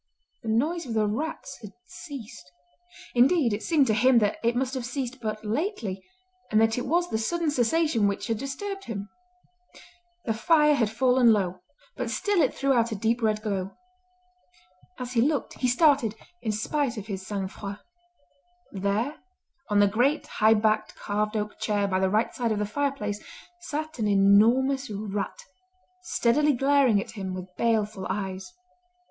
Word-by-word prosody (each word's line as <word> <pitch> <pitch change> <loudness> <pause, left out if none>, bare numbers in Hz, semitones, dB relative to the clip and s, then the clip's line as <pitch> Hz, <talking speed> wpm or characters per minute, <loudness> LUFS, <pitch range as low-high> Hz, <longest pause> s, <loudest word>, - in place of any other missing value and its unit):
The 230 - -5
noise 300 +9 0
of 230 - -4
the 215 -1 +2
rats 280 +10 -4
had 210 -2 -10
ceased. 260 - -10 0.6
Indeed 255 0 +4
it 205 - -3
seemed 310 -5 +3
to 220 - +1
him 250 +4 +4
that 210 -2 +2
it 235 +1 +2
must 260 +1 -1
have 260 -2 -3
ceased 260 0 -4
but 215 -1 -4
lately 220 - -2 0.5
and 215 - +3
that 225 0 +3
it 250 - -3
was 345 +5 +2
the 220 - 0
sudden 330 +7 0
cessation 260 -3 +2
which 200 - -2
had 225 -2 -2
disturbed 390 - -5
him. 200 -2 -5 1.2
The 225 - 0
fire 300 +5 +4
had 230 -7 +1
fallen 250 +1 +4
low, 185 -4 0 0.3
but - - -3
still 405 -4 +1
it 270 - +3
threw 275 0 +1
out 235 -2 +2
a - - -2
deep 225 +4 0
red 215 -1 0
glow. 195 -3 -3 1.2
As 250 -1 -6
he 235 - +3
looked 285 +2 -1
he 255 - +1
started 255 -4 +3 0.3
in 220 - -1
spite 240 +4 -1
of 205 - -5
his 195 -3 -5
sang 200 -2 -2
froid. 200 +1 -7 0.9
There 200 +9 -1 0.5
on 205 -1 +3
the 205 - +5
great 245 +9 +1
high 220 +1 +3
backed 215 0 +1
carved 210 +1 -2
oak 210 0 -4
chair 205 -2 0
by 185 -1 0
the 190 0 +2
right 215 +4 +1
side 235 -3 -1
of 215 - 0
the 210 - 0
fireplace 215 -3 -2 0.4
sat 310 -4 -5
an 215 - +1
enormous 225 +7 +4
rat, 205 -1 -4 0.6
steadily 295 -2 +2
glaring 270 -4 +3
at - - -6
him 190 -3 -5
with 185 0 -9
baleful 215 -4 0
eyes. 190 - -4
225 Hz, 170 wpm, -26 LUFS, 210-275 Hz, 1.2 s, the